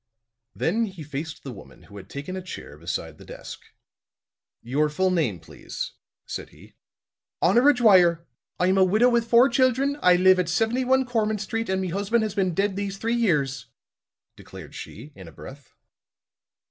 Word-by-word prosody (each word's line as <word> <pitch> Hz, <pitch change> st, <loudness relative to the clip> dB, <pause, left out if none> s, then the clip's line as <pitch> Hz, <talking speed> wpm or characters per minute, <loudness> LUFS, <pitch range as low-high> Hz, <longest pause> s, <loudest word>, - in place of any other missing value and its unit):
Then 225 Hz, +7 st, 0 dB
he 190 Hz, -6 st, -9 dB
faced 150 Hz, +2 st, -6 dB
the 135 Hz, -, -7 dB
woman 110 Hz, -, -14 dB
who 100 Hz, -, -14 dB
had 95 Hz, -1 st, -12 dB
taken 145 Hz, +6 st, -6 dB
a 190 Hz, -, -4 dB
chair 180 Hz, -, -9 dB
beside 85 Hz, +4 st, -5 dB
the -, -, -12 dB
desk. -, -, -10 dB, 1.0 s
"Your 145 Hz, +6 st, 0 dB
full 185 Hz, +5 st, 0 dB
name, 150 Hz, -, 0 dB
please," -, -, -7 dB, 0.3 s
said -, -, -7 dB
he. -, -, -18 dB, 0.7 s
"Honora 240 Hz, +11 st, +4 dB
Dwyer. 180 Hz, -8 st, +4 dB, 0.3 s
I'm 185 Hz, +2 st, +2 dB
a -, -, +6 dB
widow 215 Hz, +7 st, +4 dB
with 235 Hz, -1 st, 0 dB
four 240 Hz, +3 st, +6 dB
children; 265 Hz, +3 st, +1 dB
I 180 Hz, 0 st, +5 dB
live 185 Hz, +1 st, +5 dB
at 175 Hz, -2 st, -1 dB
71 250 Hz, +7 st, +1 dB
Cormant 215 Hz, -3 st, -1 dB
Street, 225 Hz, +1 st, -3 dB
an' 190 Hz, 0 st, 0 dB
me 185 Hz, -, -3 dB
husban' 205 Hz, +5 st, 0 dB
has 215 Hz, -2 st, -3 dB
been 185 Hz, -4 st, 0 dB
dead 195 Hz, +1 st, 0 dB
these 200 Hz, -1 st, -4 dB
three 230 Hz, +3 st, -2 dB
years," 140 Hz, -, 0 dB, 0.7 s
declared -, -, -12 dB
she, 140 Hz, +8 st, -10 dB
in 95 Hz, -3 st, -12 dB
a -, -, -11 dB
breath. 135 Hz, -, -12 dB
190 Hz, 170 wpm, -24 LUFS, 155-225 Hz, 1.0 s, a